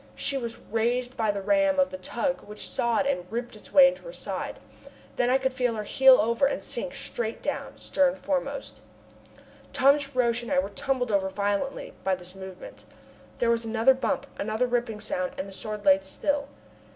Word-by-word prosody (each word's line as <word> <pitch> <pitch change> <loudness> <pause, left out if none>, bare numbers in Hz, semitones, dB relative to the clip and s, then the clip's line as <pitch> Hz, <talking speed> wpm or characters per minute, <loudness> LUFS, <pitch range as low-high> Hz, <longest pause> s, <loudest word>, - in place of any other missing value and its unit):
She 280 - 0
was 235 -4 -3
raised 245 +3 -1
by 220 -2 0
the 200 -1 -1
ram 290 +4 +3
of 275 - +3
the 185 - -5
tug 240 +8 -2
which 210 0 -6
sawed 235 +4 +1
and 180 -11 -1
ripped 240 0 -4
its 210 - -14
way 275 -2 +9
into 270 0 -2
her - - -8
side. - - -4 0.6
Then 245 - +2
I 260 - +5
could 265 -1 -1
feel 250 -3 0
her 215 - -3
heel 265 +4 +6
over 235 +5 +3
and - - -3
sink - - -4
straight 230 -1 -4
down, - - -4
stern 275 -1 +1
foremost. 285 - -3 0.9
Thomas 280 +1 +3
Roch 240 -1 +2
and 240 - -7
I 280 - +2
were 275 - +1
tumbled 250 +2 -1
over 195 -1 +2
violently 205 +6 -2
by. 190 -1 +2
this 180 0 -8
movement. 190 -1 -10 0.5
There 235 -3 +2
was 230 0 +1
another 225 +3 +4
bump, 265 +1 -1
another 220 +4 0
ripping 235 -3 -1
sound, 275 -2 -2
and 280 - -4
the 195 - -10
Sword 210 +1 -6
lay 190 0 +6
still. 280 +9 -2
240 Hz, 190 wpm, -27 LUFS, 210-275 Hz, 0.9 s, way